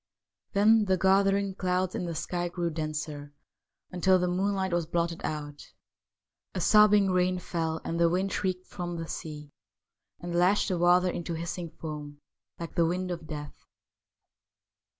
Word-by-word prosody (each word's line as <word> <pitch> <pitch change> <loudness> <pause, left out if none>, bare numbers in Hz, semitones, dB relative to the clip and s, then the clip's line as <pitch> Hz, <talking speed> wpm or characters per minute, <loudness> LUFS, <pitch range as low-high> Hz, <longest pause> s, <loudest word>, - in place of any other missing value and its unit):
Then 215 +2 +5
the 190 -1 +2
gathering 195 +1 +3
clouds 185 -1 -1
in 180 - -3
the 170 -1 -4
sky 175 +2 -2
grew 170 -1 -2
denser, 150 -2 -5 0.6
until 185 +1 +3
the 180 0 0
moon 190 +3 0
light 190 -2 -1
was 170 -2 0
blotted 170 0 -1
out. 145 -1 -6 0.8
A - - -1
sobbing 210 0 +5
rain 185 0 +2
fell, 165 -2 -2
and 170 - -2
the 170 0 +5
wind 190 +3 0
shrieked 185 -1 -2
from 175 -1 -5
the 165 0 -5
sea 150 -3 -7 0.7
and 175 0 -6
lashed 185 +5 +3
the 180 -2 -1
water 175 +1 +4
into 170 -1 -4
hissing 170 +1 -4
foam, 150 -2 -7 0.4
like 170 -1 -6
the 170 -2 +3
wind 180 +2 -2
of 165 -3 -6
death. 150 -1 -6
175 Hz, 155 wpm, -28 LUFS, 165-185 Hz, 0.8 s, Then